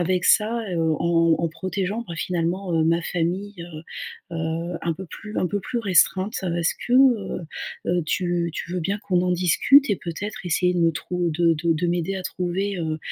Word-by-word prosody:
avec 180 +1 +1
ça, 225 +2 +3
heu, 170 - -1
en 165 +1 +3
en 170 - 0
protégeant, 195 +6 -3
bah 170 - -5
finalement, 180 +2 -1
heu, - - +3
ma 170 +1 +2
famille, 180 +5 -2
heu 160 -2 -9 0.5
heu, 165 +1 -3
un 165 - 0
peu 190 - -8
plus 210 +5 -9
un 180 - +1
peu 205 +3 -2
plus 240 - -3
restreinte. 190 +1 +3 0.2
Est-ce 165 -1 +1
que, 245 - -2
heu - - +8 0.9
heu, 175 -1 +1
tu 175 0 0
tu 175 - -5
veux 180 - -1
bien 195 +5 -1
qu'on 180 -2 +2
en 180 - +1
discute 220 - +4
et 200 - +2
peut-être 200 +4 -6
essayer 180 +1 +2
de 175 - +1
me 165 0 +4
trou 175 +2 -2
de 165 +1 +3
de 165 +2 +1
de 165 +3 -1
m'aider 175 +2 -1
à 185 - -5
trouver, 185 +2 -2
heu 160 -2 -2
175 Hz, 200 wpm, -24 LUFS, 165-190 Hz, 0.9 s, heu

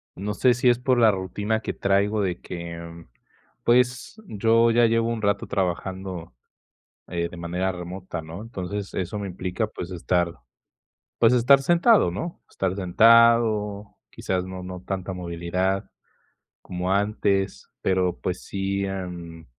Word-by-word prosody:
No 105 +3 -3
sé 125 -2 +4
si 125 +2 +1
es 120 -1 +5
por 125 0 +1
la 115 - +6
rutina 105 +3 -1
que - - -3
traigo, 100 +2 +1
de 90 -3 -2
que, 85 -1 -7
mm, 85 0 -11 0.6
pues, 125 - +1
yo 115 +2 +3
ya 120 0 +5
llevo 115 0 +2
un 115 -2 -2
rato 100 -1 0
trabajando, 95 -3 -3 0.8
eh, 85 -1 -2
de - - -10
manera 90 +3 -2
remota, 90 0 -6
¿no? 80 +5 -8
Entonces, 100 -3 -5
eso 95 +3 -3
me 100 - -4
implica, 90 +4 -3
pues 90 -3 -7
estar 90 0 0 0.9
pues 115 +1 +5
estar 130 +3 +6
sentado, 175 - +4
¿no? 135 - -5
Estar 95 -1 -2
sentado, 110 +1 +4
quizás 90 -1 -3
no 95 0 -7
no 90 0 -7
tanta 95 0 -4
movilidad 90 +2 -2 0.7
como 90 +1 -2
antes, 100 -1 0
pero, 95 -1 +1
pues 90 0 -3
sí, 100 0 -2
em 90 -4 -6
95 Hz, 145 wpm, -24 LUFS, 90-110 Hz, 0.9 s, la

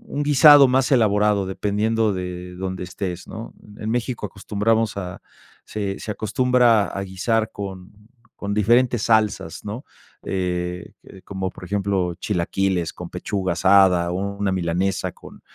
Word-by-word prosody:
1 145 - 0
guisado 145 0 +8
más 130 0 +2
elaborado, 105 -4 +3
dependiendo 105 +3 0
de 90 -1 -6
donde 95 0 -4
estés, 90 -1 -5
¿no? 110 +1 -8 0.2
En 110 - -5
México 120 -1 -2
acostumbramos 105 +2 -1
a 90 -2 -6 0.4
se 100 -2 -4
se 110 - -5
acostumbra 115 0 +2
a 100 - -5
guisar 110 +4 -1
con 95 -2 -7 0.5
con 100 0 -3
diferentes 120 +3 +3
salsas, 110 -7 0
¿no? 105 +6 -5 0.4
Eh, 90 -1 -3
que - - -16
de 95 - -13
como 95 -1 -4
por - - -13
ejemplo 95 -2 -1
chilaquiles 90 -2 -1
con 90 -1 -8
pechuga 95 +1 -3
asada, 95 -2 +4
1 100 +2 -2
milanesa 90 +2 -1
con, - - -14
100 Hz, 140 wpm, -22 LUFS, 95-110 Hz, 0.5 s, guisado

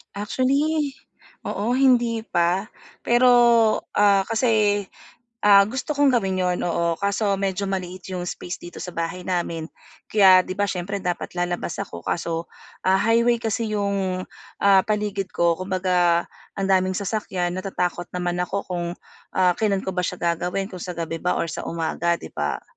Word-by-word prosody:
Actually, 275 +8 0 0.6
oo, 215 +4 -1
hindi 245 -3 +3
pa, 175 +4 +1 0.3
pero, 245 +1 +4 0.7
ah, 200 -2 +4
kasi, 215 -3 +2 0.6
ah, 200 -1 +7
gusto 255 +7 -5
kong 280 -3 +4
gawin 195 -5 0
'yun, 180 -1 0
oo, 170 -1 0
kaso 200 +2 0
medyo 195 0 -2
maliit 185 -2 -4
'yung 180 - -3
space 175 0 -6
dito 175 - -9
sa 180 - -7
bahay 170 +2 -4
namin, 170 -3 -2 0.4
kaya 190 -3 +6
'di 185 - -4
ba 205 +1 0
siyempre 190 +2 -4
dapat 180 -1 -3
lalabas 175 -1 -2
ako 85 - -9
kaso, 165 -1 -2 0.4
ah, 190 +1 +4
highway 235 +1 +3
kasi 220 0 -1
'yung, 195 -2 -1 0.4
ah, 195 -1 +5
paligid 210 -2 -1
ko, 170 -1 +2
kumbaga, 180 -2 +1 0.3
ang 195 -1 -2
daming 185 0 +3
sasakyan, 190 -3 -2
natatakot 180 -2 -2
naman 175 -1 -2
ako 190 +2 -1
kung, 175 -1 -2 0.5
ah, 180 -2 +3
kailan 200 -3 +1
ko - - -3
ba 180 -1 -1
siya 180 - -5
gagawin, 180 +4 -1
kung 185 - -8
sa 180 - -5
gabi 165 -1 -4
ba 180 - 0
or 165 - -2
sa - - -5
umaga, 170 +1 -1
'di - - -8
ba? - - -3
190 Hz, 160 wpm, -23 LUFS, 175-205 Hz, 0.7 s, ah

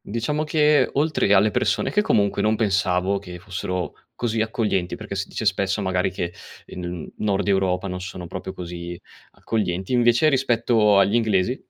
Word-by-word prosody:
Diciamo 115 +8 -2
che 150 -1 +3
oltre 150 -7 +1
alle 105 +2 +4
persone - - 0
che 210 - +3
comunque, 100 - +1
non 110 +1 +2
pensavo 95 -2 +1
che 90 -2 -9
fossero 90 -1 -4 0.2
così 115 -2 -1
accoglienti, 110 -5 -1
perché 105 -3 -8
si 100 +1 -3
dice 110 - -5
spesso 95 0 +1
magari 90 -1 0
che, 90 -1 -4 0.3
ehm, 90 - -8
in 85 - -3
N - - -9
Nord 100 -1 0
Europa 95 -1 +1
non 90 -1 -5
sono 90 -1 -7
proprio 95 +2 -6
così 85 -1 -7 0.3
accoglienti, 95 -2 -2
invece 120 +5 +4
rispetto 115 -6 +3
agli 100 +1 +4
inglesi 110 +1 +1
100 Hz, 170 wpm, -23 LUFS, 90-115 Hz, 0.3 s, alle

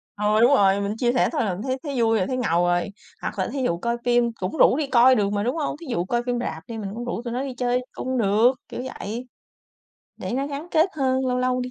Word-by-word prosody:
Ừ, 210 +1 +2
đúng 245 +4 +6
rồi, 200 -4 +4
mình 200 +2 -2
chia 240 0 +1
sẻ 255 - +2
thôi - - 0
là 190 - -1
mình 185 - -6
thấy 260 0 -1
thấy 275 -6 -2
vui 225 -1 +3
rồi, 185 - 0
thấy 255 - -2
ngầu 175 -8 +1
rồi. 175 +2 +1 0.3
Hoặc - - -4
là - - 0
thí 275 -2 -3
dụ 170 -9 0
coi 235 +6 -2
phim 240 -1 +3
cũng 185 -4 -4
rủ 255 - +5
đi 300 -2 -1
coi 255 0 +6
được 200 -1 +1
mà, 205 0 0
đúng 250 +6 -1
hông? 305 -4 -2
Thí - - -8
dụ 175 -7 -1
coi 240 +4 -1
phim 245 -1 -1
rạp 160 -9 -4
đi 230 - -6
mình 205 -3 -4
cũng 240 - -5
rủ 240 -1 -3
tụi 235 - -4
nó 250 - -1
đi 270 -2 -4
chơi 250 0 +1
cung 260 0 -3
được, 220 +3 +4 0.2
kiểu 245 - -5 0.2
vậy. 235 +5 -5 0.9
Để - - -5
nó 270 +3 -1
gắn 290 +4 -6
kết 320 +3 +3
hơn, 260 -2 +1
lâu 250 0 0
lâu 255 0 +1
đi 250 0 -4
240 Hz, 280 wpm, -24 LUFS, 210-255 Hz, 0.9 s, đúng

